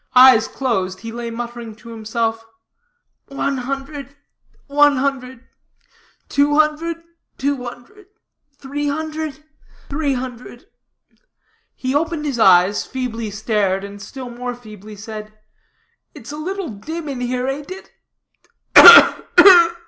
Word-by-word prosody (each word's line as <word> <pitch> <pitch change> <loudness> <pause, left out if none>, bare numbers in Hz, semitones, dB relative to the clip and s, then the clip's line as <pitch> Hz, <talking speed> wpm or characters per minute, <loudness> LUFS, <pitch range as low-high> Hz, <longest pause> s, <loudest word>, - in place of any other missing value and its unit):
Eyes 250 -3 +7
closed, 190 -8 -3
he 225 - -7
lay 235 0 -6
muttering 235 -1 -7
to 230 +1 -15
himself 225 0 -3 0.8
"One 275 0 -3
hundred, 275 +2 -6 0.5
one 290 0 +3
hundred 260 -2 -3 0.8
two 290 +1 +1
hundred, 320 +2 0 0.3
two 275 -2 -2
hundred 250 - -12 0.5
three 290 +2 -5
hundred, 310 0 -5 0.5
three 285 -1 -1
hundred." 250 +3 -8 1.1
He 260 0 -4
opened 315 +1 -2
his 275 -5 -3
eyes, 190 -1 +4
feebly 230 -4 -5
stared, 205 -2 -1
and 200 0 -10
still 250 +4 -9
more 245 +1 -6
feebly 215 -3 -13
said 215 +1 -10 0.8
"It's 235 - -11
a - - -7
little 375 +2 -5
dim 310 +11 -7
here, 250 +1 -3
ain't 280 +3 -5
it? 380 +1 -10
255 Hz, 110 wpm, -19 LUFS, 225-290 Hz, 1.1 s, Eyes